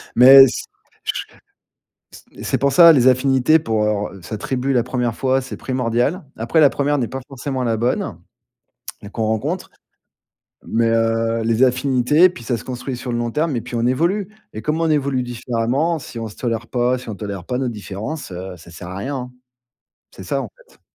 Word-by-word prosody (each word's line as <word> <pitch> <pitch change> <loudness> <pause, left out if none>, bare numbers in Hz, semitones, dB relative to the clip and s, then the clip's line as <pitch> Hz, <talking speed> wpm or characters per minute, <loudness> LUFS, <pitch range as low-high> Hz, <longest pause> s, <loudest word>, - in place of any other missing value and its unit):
mais 135 +2 +10
c - - -4 0.4
ch - - -3 0.9
c - - -14
c'est - - 0
pour 140 -1 +1
ça, 170 -2 +9
les 130 -3 +5
affinités 135 +4 +4
pour, 110 -8 -1
heu, 105 -2 -2
re - - -17
sa 110 - -5
tribu, 130 +4 -2
la 120 -2 +3
première 125 -2 -1
fois, 130 +1 +1
c'est 135 - -7
primordial. 130 - -1
Après, 120 +8 +1
la 145 - +6
première 145 +1 0
n'est 120 - -1
pas 135 - -5
forcément 135 -1 -4
la 115 -2 +1
bonne 120 +3 -1 0.8
et 100 - -10
qu'on 110 +1 -3
rencontre, 135 - -2 1.0
mais, 115 +1 +1
heu, 115 0 +1
les 115 +2 +1
affinités, 130 +6 +4
puis 120 - -11
ça 120 - -1
se 110 - -10
construit 125 0 -5
sur 125 0 -5
le 120 - -1
long 120 0 -2
terme 150 +2 -1
et - - -1
puis 120 +1 -6
on 115 +1 +1
évolue 175 +10 +1 0.3
et 110 - -6
comme 155 +2 -1
on 165 - +1
évolue 140 -4 +1
différemment, 125 +6 -1
si 120 -3 -9
on 115 -1 -4
se 105 - -12
tolère 115 -1 -3
pas, 125 0 +1
si 125 - -11
on - - -4
tolère 100 -3 -6
pas 125 0 -3
nos 130 -2 -1
différences, 110 - -6
heu, 90 +1 -7
ça 85 +1 -15
sert 85 +1 -9
à 95 - -7
rien, 135 +7 -3
hein. 125 0 -6 0.8
C'est - - -11
ça, - - -1
en - - -6 0.2
fait. - - -25
125 Hz, 205 wpm, -20 LUFS, 115-135 Hz, 1.0 s, mais